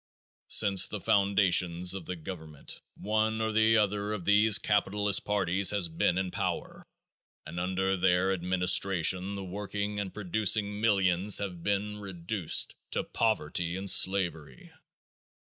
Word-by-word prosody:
Since 100 Hz, -2 st, +4 dB
the 105 Hz, -, -6 dB
foundation 95 Hz, -3 st, +2 dB
of 95 Hz, -4 st, -7 dB
the 90 Hz, -, -4 dB
government 80 Hz, -3 st, -8 dB
one 110 Hz, +1 st, -2 dB
or 110 Hz, 0 st, -2 dB
the 110 Hz, +1 st, +3 dB
other 105 Hz, 0 st, -1 dB
of 95 Hz, -5 st, -6 dB
these 105 Hz, 0 st, +4 dB
capitalist 105 Hz, -1 st, +1 dB
parties 100 Hz, -2 st, +1 dB
has 100 Hz, -5 st, 0 dB
been 85 Hz, +2 st, -1 dB
in 95 Hz, -1 st, -3 dB
power -, -, -5 dB, 0.6 s
and 85 Hz, -, -7 dB
under 95 Hz, +1 st, -1 dB
their 95 Hz, +1 st, +1 dB
administration 95 Hz, +1 st, +2 dB
the 100 Hz, -, -6 dB
working 105 Hz, +2 st, -5 dB
and 100 Hz, -2 st, -5 dB
producing 105 Hz, +1 st, 0 dB
millions 95 Hz, -2 st, +2 dB
have 90 Hz, -4 st, -5 dB
been 100 Hz, +2 st, -3 dB
reduced 95 Hz, -2 st, -1 dB, 0.2 s
to -, -, -2 dB
poverty 85 Hz, -5 st, -1 dB
and 95 Hz, +1 st, -6 dB
slavery. 90 Hz, -8 st, +1 dB
95 Hz, 130 wpm, -28 LUFS, 90-105 Hz, 0.6 s, Since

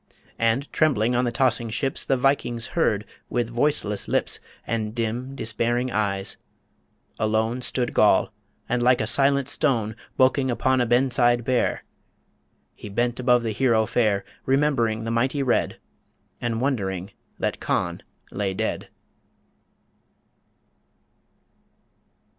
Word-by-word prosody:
And, 115 Hz, +5 st, +1 dB
trembling 125 Hz, -7 st, +2 dB
on 125 Hz, +1 st, +2 dB
the 120 Hz, -, 0 dB
tossing 120 Hz, -1 st, +1 dB
ships, 130 Hz, +4 st, -1 dB
The 135 Hz, -, +1 dB
Vikings 125 Hz, -3 st, 0 dB
heard, 105 Hz, -11 st, +1 dB, 0.2 s
with 120 Hz, -1 st, -1 dB
voiceless 120 Hz, -5 st, 0 dB
lips -, -, 0 dB, 0.3 s
And 110 Hz, -1 st, -2 dB
dim, 120 Hz, +4 st, -3 dB
despairing 120 Hz, +1 st, 0 dB
eyes... 100 Hz, -3 st, -1 dB, 0.8 s
Alone 110 Hz, +3 st, 0 dB
Stood 125 Hz, 0 st, -1 dB
Goll, 105 Hz, 0 st, +4 dB, 0.4 s
and 125 Hz, 0 st, 0 dB
like 125 Hz, +1 st, +4 dB
a -, -, 0 dB
silent 140 Hz, +3 st, +2 dB
stone 120 Hz, -7 st, 0 dB, 0.2 s
Bulking 130 Hz, +1 st, +3 dB
upon 130 Hz, +1 st, +1 dB
a 120 Hz, -, +1 dB
ben 125 Hz, +3 st, +3 dB
side 120 Hz, 0 st, +3 dB
bare, 130 Hz, -1 st, 0 dB, 0.9 s
He 105 Hz, -, -10 dB
bent 120 Hz, +4 st, -1 dB
above 125 Hz, -1 st, +3 dB
the 115 Hz, -, -1 dB
hero 115 Hz, -1 st, +2 dB
fair 105 Hz, -4 st, +1 dB, 0.2 s
Remembering 130 Hz, -5 st, +1 dB
the 115 Hz, -, -3 dB
mighty 130 Hz, +4 st, +1 dB
Red, 125 Hz, -3 st, 0 dB, 0.6 s
And 115 Hz, -1 st, -1 dB
wondering 100 Hz, -8 st, -2 dB, 0.3 s
that -, -, -2 dB
Conn -, -, -1 dB, 0.3 s
lay 95 Hz, -1 st, -2 dB
dead. -, -, -3 dB
120 Hz, 125 wpm, -24 LUFS, 110-130 Hz, 0.9 s, Goll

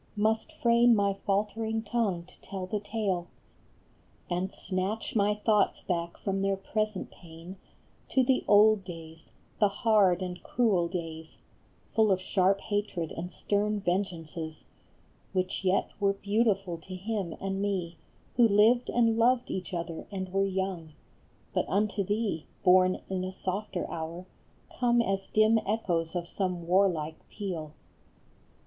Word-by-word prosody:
Must 220 Hz, +1 st, +1 dB
frame 235 Hz, 0 st, +4 dB
my 200 Hz, -1 st, +2 dB
faltering 220 Hz, +2 st, 0 dB
tongue 205 Hz, -6 st, 0 dB
to -, -, -20 dB
tell 190 Hz, -2 st, -5 dB
the 205 Hz, +3 st, -2 dB
tale, 200 Hz, -4 st, -2 dB, 1.0 s
And 180 Hz, +2 st, -1 dB
snatch 195 Hz, +5 st, -3 dB
my 210 Hz, 0 st, +3 dB
thoughts 210 Hz, 0 st, +2 dB
back 170 Hz, -2 st, -2 dB
from 195 Hz, -1 st, -2 dB
their 195 Hz, 0 st, +1 dB
present 215 Hz, +1 st, -2 dB
pain 170 Hz, +2 st, -12 dB, 0.5 s
To 260 Hz, -, +3 dB
the 255 Hz, +1 st, +2 dB
old 210 Hz, 0 st, +6 dB
days, 165 Hz, -3 st, -10 dB, 0.3 s
the 210 Hz, -, +6 dB
hard 200 Hz, -3 st, +3 dB
and 180 Hz, -1 st, -5 dB
cruel 205 Hz, -8 st, +2 dB
days, 165 Hz, -2 st, -6 dB, 0.6 s
Full 220 Hz, -2 st, +4 dB
of 190 Hz, -, +3 dB
sharp 190 Hz, +1 st, +2 dB
hatred 205 Hz, -6 st, -2 dB
and 175 Hz, +2 st, -5 dB
stern 210 Hz, +1 st, 0 dB
vengeances, 170 Hz, -4 st, -3 dB, 0.7 s
Which 185 Hz, 0 st, -1 dB
yet 190 Hz, +1 st, +1 dB
were 200 Hz, -1 st, +3 dB
beautiful 200 Hz, -3 st, 0 dB
to 185 Hz, +3 st, -9 dB
him 195 Hz, -2 st, -3 dB
and 195 Hz, 0 st, -2 dB
me 185 Hz, -4 st, -2 dB, 0.4 s
Who 240 Hz, -2 st, +7 dB
lived 225 Hz, +4 st, +4 dB
and 230 Hz, -1 st, +2 dB
loved 245 Hz, +1 st, +3 dB
each 185 Hz, -4 st, -4 dB
other 170 Hz, -2 st, -4 dB
and 190 Hz, -2 st, -5 dB
were 195 Hz, 0 st, +2 dB
young; 190 Hz, -4 st, -3 dB, 0.6 s
But -, -, 0 dB
unto 205 Hz, 0 st, +1 dB
thee, 205 Hz, -4 st, -1 dB, 0.2 s
born 185 Hz, 0 st, +5 dB
in 185 Hz, -1 st, -2 dB
a 185 Hz, -, -3 dB
softer 190 Hz, 0 st, -3 dB
hour, 170 Hz, +2 st, -5 dB, 0.5 s
Come 240 Hz, -1 st, +3 dB
as 195 Hz, -2 st, -2 dB
dim 215 Hz, +1 st, +4 dB
echoes 185 Hz, -6 st, -1 dB
of 170 Hz, -1 st, -2 dB
some 180 Hz, -3 st, -2 dB
warlike 170 Hz, -4 st, +2 dB
peal. 170 Hz, -7 st, -5 dB
195 Hz, 140 wpm, -29 LUFS, 180-210 Hz, 1.0 s, Who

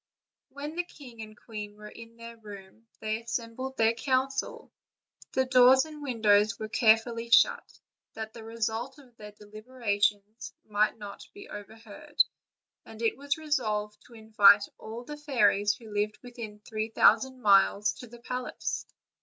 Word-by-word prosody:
When 290 Hz, +3 st, -7 dB
the 355 Hz, -, +1 dB
king 255 Hz, -9 st, -13 dB
and 215 Hz, 0 st, -10 dB
queen 210 Hz, -2 st, -8 dB
were 210 Hz, 0 st, -11 dB
in 230 Hz, +1 st, -13 dB
their 230 Hz, 0 st, -10 dB
room, 210 Hz, 0 st, -13 dB
they 220 Hz, +1 st, -2 dB
assembled 235 Hz, +3 st, -5 dB
their 225 Hz, 0 st, +3 dB
council; 265 Hz, +2 st, -2 dB, 0.6 s
the 260 Hz, -, +2 dB
doors 255 Hz, +1 st, +6 dB
and 305 Hz, -1 st, -11 dB
windows 215 Hz, -6 st, +2 dB
were 215 Hz, -, -6 dB
carefully 230 Hz, +1 st, +2 dB
shut, 235 Hz, -, +3 dB, 0.4 s
that 220 Hz, 0 st, -6 dB
the 230 Hz, -, -10 dB
result 225 Hz, +3 st, -3 dB
of 255 Hz, -5 st, -19 dB
their 210 Hz, -1 st, -10 dB
deliberations 210 Hz, -1 st, -3 dB
might 210 Hz, +1 st, +1 dB
not 205 Hz, -2 st, -10 dB
be 405 Hz, 0 st, -12 dB
overheard, 225 Hz, +8 st, -2 dB, 0.6 s
and 220 Hz, -, -13 dB
it 230 Hz, -1 st, 0 dB
was 280 Hz, +2 st, -2 dB
resolved 215 Hz, -9 st, -2 dB
to 235 Hz, -, -16 dB
invite 210 Hz, -2 st, +6 dB, 0.2 s
all 225 Hz, +2 st, -8 dB
the 295 Hz, +4 st, -8 dB
fairies 210 Hz, -8 st, +2 dB
who 220 Hz, -3 st, -13 dB
lived 210 Hz, +1 st, -1 dB
within 230 Hz, -4 st, -9 dB
three 215 Hz, 0 st, -4 dB
thousand 260 Hz, +3 st, +3 dB
miles, 200 Hz, -1 st, +4 dB
to 245 Hz, -, -9 dB
the 235 Hz, +1 st, -14 dB
palace. 250 Hz, +1 st, -4 dB
225 Hz, 150 wpm, -28 LUFS, 210-255 Hz, 0.6 s, doors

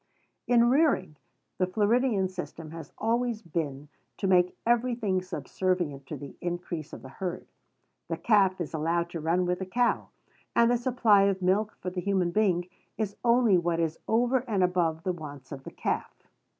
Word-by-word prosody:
In 240 Hz, -1 st, +5 dB
rearing, 270 Hz, -, +2 dB, 0.4 s
the 185 Hz, -, +2 dB
Floridian 210 Hz, +1 st, +2 dB
system 165 Hz, -4 st, -7 dB
has 160 Hz, -3 st, -9 dB
always 235 Hz, 0 st, 0 dB
been 150 Hz, -4 st, -4 dB, 0.3 s
to -, -, -3 dB
make 180 Hz, -1 st, +3 dB
every 240 Hz, +1 st, +2 dB
thing 195 Hz, -6 st, 0 dB
subservient 180 Hz, -5 st, -2 dB
to -, -, -5 dB
the 140 Hz, -1 st, -9 dB
increase 175 Hz, -3 st, -4 dB
of -, -, -9 dB
the 130 Hz, -, -9 dB
herd. 185 Hz, +4 st, -5 dB, 0.6 s
The -, -, -2 dB
calf 195 Hz, -4 st, +3 dB
is 170 Hz, -2 st, -4 dB
allowed 170 Hz, +2 st, 0 dB
to 170 Hz, -, -4 dB
run 170 Hz, +4 st, +1 dB
with 180 Hz, 0 st, -1 dB
the 190 Hz, -, -3 dB
cow; 240 Hz, +5 st, +1 dB, 0.5 s
and 235 Hz, 0 st, +5 dB
the 245 Hz, -, +3 dB
supply 235 Hz, -5 st, +4 dB
of 195 Hz, -1 st, 0 dB
milk 200 Hz, +4 st, +1 dB
for 180 Hz, -, -3 dB
the 180 Hz, 0 st, -3 dB
human 190 Hz, -2 st, +1 dB
being 180 Hz, -3 st, +1 dB, 0.3 s
is 210 Hz, -3 st, -2 dB
only 235 Hz, -5 st, +4 dB
what 170 Hz, -1 st, 0 dB
is 165 Hz, -1 st, -1 dB
over 245 Hz, +3 st, +3 dB
and 200 Hz, -5 st, +1 dB
above 170 Hz, -3 st, +1 dB
the 185 Hz, -, 0 dB
wants 145 Hz, -5 st, -9 dB
of 135 Hz, -2 st, -8 dB
the -, -, -7 dB
calf. -, -, -2 dB
185 Hz, 175 wpm, -28 LUFS, 170-220 Hz, 0.6 s, In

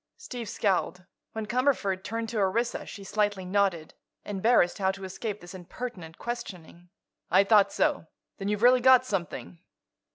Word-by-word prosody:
Steve 245 Hz, -, -7 dB
scowled. 180 Hz, -2 st, -1 dB, 0.3 s
When 220 Hz, -1 st, -4 dB
Cumberford 215 Hz, -5 st, 0 dB
turned 225 Hz, +1 st, -3 dB
to 225 Hz, -2 st, -2 dB
Orissa 230 Hz, +5 st, 0 dB
she 200 Hz, -, -9 dB
slightly 205 Hz, -1 st, -1 dB
nodded, 185 Hz, -4 st, 0 dB, 0.3 s
embarrassed 205 Hz, -2 st, +2 dB
how 190 Hz, -1 st, +2 dB
to 195 Hz, 0 st, -4 dB
escape 200 Hz, +3 st, -5 dB
this 175 Hz, +1 st, -11 dB
impertinent 185 Hz, -2 st, -8 dB
questioning. 180 Hz, -7 st, -7 dB, 0.4 s
"I 190 Hz, +3 st, +5 dB
thought 205 Hz, -1 st, +5 dB
so. -, -, 0 dB, 0.3 s
Then 195 Hz, -, -3 dB
you've 210 Hz, +1 st, -1 dB
really 250 Hz, +1 st, +6 dB
got 255 Hz, 0 st, +6 dB
something?" 155 Hz, -, -4 dB
200 Hz, 150 wpm, -28 LUFS, 185-235 Hz, 0.4 s, really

